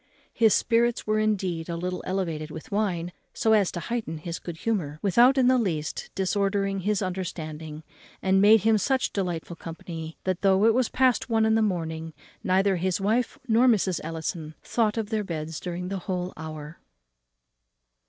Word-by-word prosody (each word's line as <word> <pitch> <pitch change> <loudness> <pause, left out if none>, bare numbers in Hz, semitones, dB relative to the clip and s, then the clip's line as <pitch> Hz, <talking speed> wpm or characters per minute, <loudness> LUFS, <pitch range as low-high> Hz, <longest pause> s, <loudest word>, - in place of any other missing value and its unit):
His 225 -3 +4
spirits 235 0 +2
were 215 0 +1
indeed 190 -6 -1
a 170 - -2
little 180 +1 -3
elevated 165 -5 -2
with 155 0 -9
wine, 185 -5 -1 0.2
so 220 - +3
as 205 -4 +3
to 175 - -3
heighten 220 -6 -3
his 165 +2 -5
good 170 -2 -7
humour, 165 -9 -2
without 240 +7 +5
in 260 - +4
the 255 0 +4
least 160 -8 -2
disordering 195 0 0
his 205 +2 0
understanding, 160 -4 -5 0.4
and 190 0 +3
made 210 +1 +7
him 220 +1 +3
such 260 +6 0
delightful 175 -3 -3
company, 165 -1 -8
that, 185 -1 -1
though 195 +1 +4
it 225 - +5
was 250 0 +1
past 255 -1 +2
one 225 -1 +3
in 220 - +3
the 225 - +3
morning, 165 -5 -2 0.3
neither 190 +1 +2
his 185 +2 0
wife 220 +5 0
nor 235 +2 +4
Mrs. 190 -7 +2
Ellison 160 0 -5
thought 225 -2 0
of 220 0 -3
their 215 -1 0
beds 160 -3 -5
during 180 +1 -4
a 195 - -2
whole 180 0 -3
hour. 155 0 -8
190 Hz, 175 wpm, -26 LUFS, 165-215 Hz, 0.4 s, made